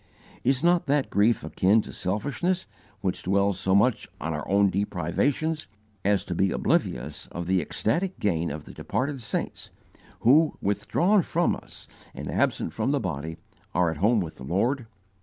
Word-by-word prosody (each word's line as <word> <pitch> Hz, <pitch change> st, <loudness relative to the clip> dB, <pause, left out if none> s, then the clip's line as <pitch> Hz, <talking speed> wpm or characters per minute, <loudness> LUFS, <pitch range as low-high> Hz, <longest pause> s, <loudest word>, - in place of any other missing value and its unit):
Is 130 Hz, +3 st, +2 dB
not 175 Hz, -2 st, +3 dB
that 140 Hz, 0 st, +1 dB
grief 105 Hz, +4 st, +3 dB
akin 95 Hz, +7 st, +3 dB
to -, -, -10 dB
selfishness 145 Hz, -, -1 dB, 0.4 s
which 95 Hz, -2 st, -1 dB
dwells 100 Hz, +1 st, +1 dB
so 95 Hz, 0 st, +2 dB
much 115 Hz, +3 st, +2 dB
on 80 Hz, +2 st, -2 dB
our 75 Hz, -, -4 dB
own 100 Hz, 0 st, +4 dB
deprivations 115 Hz, -, -1 dB, 0.4 s
as 100 Hz, 0 st, +2 dB
to 90 Hz, -, -3 dB
be 95 Hz, +3 st, +2 dB
oblivious -, -, -1 dB
of 85 Hz, -, -5 dB
the 95 Hz, 0 st, +2 dB
ecstatic 175 Hz, -, -1 dB
gain 85 Hz, -4 st, 0 dB
of 75 Hz, +1 st, -6 dB
the -, -, -11 dB
departed 135 Hz, 0 st, -2 dB
saints 110 Hz, -, -4 dB, 0.5 s
who, 150 Hz, +7 st, +5 dB
withdrawn 160 Hz, -, +2 dB
from 170 Hz, +1 st, +1 dB
us -, -, -12 dB, 0.3 s
and -, -, -5 dB
absent -, -, 0 dB
from -, -, -1 dB
the 145 Hz, 0 st, +2 dB
body, 80 Hz, -, -4 dB, 0.4 s
are 90 Hz, -2 st, +3 dB
at 80 Hz, -, -6 dB
home 105 Hz, +5 st, +3 dB
with 80 Hz, -3 st, -6 dB
the -, -, -9 dB
Lord? 115 Hz, -, 0 dB
100 Hz, 165 wpm, -26 LUFS, 90-140 Hz, 0.5 s, who